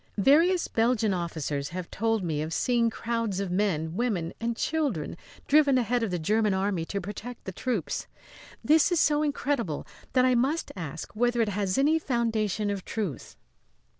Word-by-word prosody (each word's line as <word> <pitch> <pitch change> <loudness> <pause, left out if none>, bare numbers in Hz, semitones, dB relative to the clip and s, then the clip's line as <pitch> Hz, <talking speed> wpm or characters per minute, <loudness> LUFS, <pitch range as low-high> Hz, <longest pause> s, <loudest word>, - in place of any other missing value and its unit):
"Various 330 - +4
Belgian 225 -2 +2
officers 155 -5 -3
have 180 0 -6
told 225 -1 0
me 155 -4 -1
of 160 +1 -3
seeing 235 -2 +2
crowds 230 -3 -2
of 195 -2 -2
men, 175 -4 0
women 195 -8 -1
and 230 0 -1
children 285 - -1 0.3
driven 285 -2 +5
ahead 245 0 +1
of 225 - 0
the 180 - -1
German 210 +4 +1
Army 190 -3 0
to 200 - -3
protect 210 +6 -7
the 190 - -4
troops. 225 -1 -2 0.6
This 315 +3 +4
is 350 - +3
so 295 0 +3
incredible 280 - -1 0.3
that 255 -1 +4
I 255 - +4
must 270 +7 0
ask 165 +1 -7
whether 240 +2 +1
it 225 -2 +2
has 195 -1 -1
any 300 +4 +3
foundation 220 - 0
of 195 -2 -4
truth." 205 -10 -4
220 Hz, 165 wpm, -27 LUFS, 185-250 Hz, 0.6 s, driven